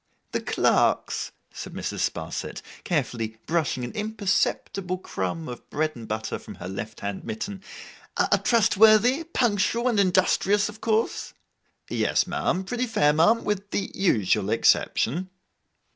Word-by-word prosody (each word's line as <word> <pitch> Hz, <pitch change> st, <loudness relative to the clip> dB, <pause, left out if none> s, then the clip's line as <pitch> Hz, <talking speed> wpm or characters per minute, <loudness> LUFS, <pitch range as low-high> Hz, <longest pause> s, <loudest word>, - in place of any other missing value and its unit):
'The -, -, -1 dB
clerks,' -, -, +1 dB, 0.2 s
said -, -, -7 dB
Mrs. -, -, -4 dB
Sparsit, -, -, -3 dB, 0.2 s
carefully 115 Hz, -9 st, -2 dB
brushing 155 Hz, -5 st, 0 dB
an 120 Hz, -, -4 dB
imperceptible 200 Hz, -3 st, -1 dB
crumb 165 Hz, -3 st, -4 dB
of 125 Hz, -1 st, -9 dB
bread 155 Hz, +1 st, 0 dB
and 115 Hz, -2 st, -9 dB
butter 110 Hz, +1 st, -3 dB
from -, -, -10 dB
her 90 Hz, -, -8 dB
left 95 Hz, +3 st, -6 dB
hand 100 Hz, -1 st, -4 dB
mitten, 205 Hz, -3 st, -5 dB, 0.6 s
'are -, -, +3 dB
trustworthy, 225 Hz, +5 st, +5 dB
punctual, 235 Hz, -, +1 dB
and 230 Hz, -4 st, +2 dB
industrious, 195 Hz, +2 st, +3 dB
of 210 Hz, +1 st, -11 dB
course?' 225 Hz, 0 st, 0 dB, 0.5 s
'Yes, -, -, +1 dB
ma'am, 185 Hz, -, -1 dB
pretty 245 Hz, +6 st, -2 dB
fair, 150 Hz, -10 st, +3 dB
ma'am. 190 Hz, +10 st, +4 dB
With 205 Hz, -1 st, -2 dB
the 200 Hz, -1 st, -2 dB
usual 105 Hz, -, +2 dB
exception. 140 Hz, +8 st, +2 dB
190 Hz, 130 wpm, -25 LUFS, 135-215 Hz, 0.6 s, trustworthy